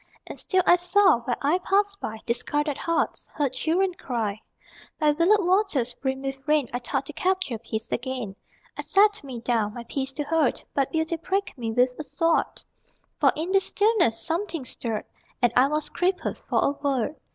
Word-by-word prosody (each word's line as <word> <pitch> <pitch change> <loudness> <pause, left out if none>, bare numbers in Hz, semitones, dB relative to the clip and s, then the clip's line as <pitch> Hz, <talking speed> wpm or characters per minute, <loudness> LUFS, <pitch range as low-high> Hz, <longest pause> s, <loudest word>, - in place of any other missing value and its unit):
And - - -7
still 370 -1 +1
I 350 - +6
saw 360 -4 +4
Where 240 0 -2
I 310 +6 +3
passed 400 +2 +1
by 220 - -5
Discarded 295 +5 -1
hearts, 335 +4 -1
Heard 280 -4 0
children 350 +7 +1
cry. 225 -9 -3 0.6
By 305 -2 +4
willowed 350 +6 +3
waters 360 - +1
Brimmed 265 +1 -3
with 270 0 -3
rain 300 -4 +3
I 245 - -1
thought 245 - -2
to - - -8
capture 370 -11 -1
Peace 220 0 -5
again. 245 -5 -3 0.4
I - - -4
sat 415 -1 +3
me 255 -4 -7
down 225 -3 0
My 240 - -6
Peace 265 +3 -3
to 295 - -3
hoard, 310 -2 +1
But 275 -2 0
Beauty 320 +1 0
pricked 390 +4 -2
me 230 -4 -3
With 250 +2 +3
a - - -3
sword. 310 +4 0 0.6
For - - +5
in 330 +4 -3
the 390 - +5
stillness 405 - +2
Something 335 -3 -2
stirred, 225 -3 -3 0.3
And 240 -2 +2
I 255 +2 +6
was 300 +1 -1
crippled 365 +1 -1
For - - +1
a - - +3
word. 280 -1 -1
290 Hz, 185 wpm, -25 LUFS, 245-355 Hz, 0.6 s, I